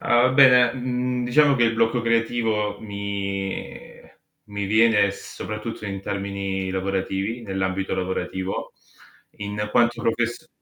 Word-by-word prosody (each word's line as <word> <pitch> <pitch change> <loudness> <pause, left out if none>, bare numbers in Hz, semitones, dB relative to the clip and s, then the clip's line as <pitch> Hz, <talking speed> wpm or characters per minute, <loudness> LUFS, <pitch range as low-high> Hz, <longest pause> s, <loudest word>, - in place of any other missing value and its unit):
Uhm, 125 +2 +3
bene, 125 -3 +7
mhmm, 125 0 -2
diciamo 140 +3 +4
che 120 - +1
il 115 - +2
blocco 115 +2 +2
creativo 115 -3 0
mi 100 -2 -5 0.5
mi 100 -1 -4
viene 110 -1 +4
soprattutto 105 +2 -7
in 100 -1 -5
termini 100 -1 -3
lavorativi, 95 +3 -2
nell'ambito 95 -2 -2
lavorativo, 95 0 -3 0.7
in 105 0 -5 0.2
quanto 120 -1 +2
profess 120 +5 -1
105 Hz, 115 wpm, -23 LUFS, 100-120 Hz, 0.7 s, bene